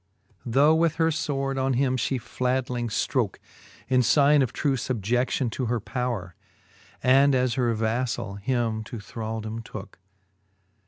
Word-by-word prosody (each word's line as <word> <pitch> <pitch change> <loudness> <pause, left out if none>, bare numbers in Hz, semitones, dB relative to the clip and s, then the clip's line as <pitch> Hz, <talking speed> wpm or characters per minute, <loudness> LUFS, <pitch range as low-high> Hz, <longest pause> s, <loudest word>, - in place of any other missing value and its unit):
Tho' 140 +6 +5
with 160 -1 +2
her 165 0 +2
fvvord 135 -3 -1
on 135 0 +1
him 130 0 +1
fhe 130 +1 -1
flatling 125 0 -2
ftrooke, 110 - 0 0.5
In 130 -1 +3
figne 140 +5 +5
of 130 -3 0
true 140 +1 0
fubie(9:ion 125 +1 -1
to 125 +3 -3
her 120 0 0
powre, 110 -4 -3 0.7
And 135 +2 +5
as 125 -2 +1
her 125 -3 +1
vaflall 110 -2 -2
him 115 -1 -1
to 120 - -7
thraldome 110 +1 -5
tooke. 100 -3 -9
125 Hz, 140 wpm, -26 LUFS, 115-135 Hz, 0.7 s, Tho